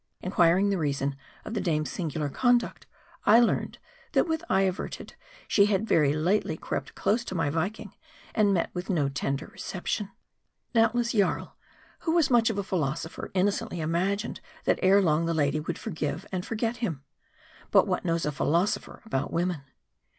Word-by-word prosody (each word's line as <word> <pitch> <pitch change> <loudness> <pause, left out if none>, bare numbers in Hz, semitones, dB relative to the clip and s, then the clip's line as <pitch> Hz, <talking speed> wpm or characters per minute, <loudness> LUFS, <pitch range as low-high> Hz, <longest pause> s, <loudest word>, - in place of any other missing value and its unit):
Inquiring 185 +2 +3
the 195 - 0
reason 140 -2 -1 0.3
of 215 - -5
the 215 - -1
dame's 155 -6 0
singular 155 -4 -2
conduct, 245 - +1 0.4
I 220 +3 +7
learned, 240 - +1 0.4
that - - +3
with 320 0 -1
eye 190 - +3
averted, 185 -1 -3 0.3
she 200 -1 +4
had 205 +1 0
very 150 -8 +4
lately 175 +7 +1
crept - - -4
close 230 +3 +1
to 185 - -5
my 165 -4 +1
Viking, 195 +5 -3 0.4
and 210 -3 +3
met 180 -4 0
with 180 +2 -5
no 150 -7 +1
tender 135 +1 -2
reception. 190 0 -4
fr3 - - -26 0.6
Doubtless, 235 +1 +3
Jarl, 205 -4 0 0.4
who 325 - -1
was 320 -6 +3
much 235 -2 +5
of 220 - -2
a 200 - 0
philosopher, 160 -4 -3
inno 190 +2 +4
cently 215 -2 -5
imagine^ 185 +7 -1 0.2
that - - +2
ere 195 +2 +5
long 165 -1 +2
the 165 - 0
lady 145 -1 +1
would 150 - -3
ibrgive 155 -8 -4
and 185 -1 -3
forget 225 +1 -1
him. 170 - -3 0.7
But - - +5
what - - -1
knows 165 -1 0
a 150 - 0
philosopher 180 +8 0
about 135 -11 -2
women 175 -2 -1
185 Hz, 170 wpm, -27 LUFS, 160-215 Hz, 0.7 s, I